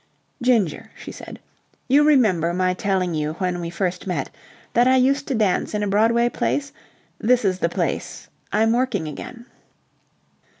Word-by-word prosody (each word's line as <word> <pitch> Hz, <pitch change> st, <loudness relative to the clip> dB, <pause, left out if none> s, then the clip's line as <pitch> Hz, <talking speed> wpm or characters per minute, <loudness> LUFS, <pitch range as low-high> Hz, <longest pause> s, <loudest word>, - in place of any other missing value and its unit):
"Ginger," 230 Hz, -10 st, +1 dB
she -, -, -9 dB
said, -, -, -10 dB, 0.5 s
"you 280 Hz, +3 st, +5 dB
remember 205 Hz, -, +3 dB
my 185 Hz, 0 st, +1 dB
telling 185 Hz, -2 st, -1 dB
you 155 Hz, 0 st, -2 dB
when 180 Hz, 0 st, -2 dB
we 170 Hz, -, -4 dB
first 180 Hz, +1 st, -3 dB
met 180 Hz, -, -2 dB, 0.4 s
that 240 Hz, +1 st, +4 dB
I 260 Hz, -, +5 dB
used 275 Hz, +2 st, +2 dB
to 270 Hz, -, -1 dB
dance 210 Hz, -1 st, 0 dB
in 210 Hz, -, -1 dB
a -, -, 0 dB
Broadway 225 Hz, +4 st, +3 dB
place? 280 Hz, +3 st, -2 dB, 0.5 s
This 245 Hz, 0 st, +2 dB
is 185 Hz, -1 st, +1 dB
the 170 Hz, -, +1 dB
place. -, -, -3 dB, 0.2 s
I'm 225 Hz, +1 st, +2 dB
working 240 Hz, -9 st, 0 dB
again." 235 Hz, -, -8 dB
210 Hz, 160 wpm, -22 LUFS, 180-245 Hz, 0.5 s, you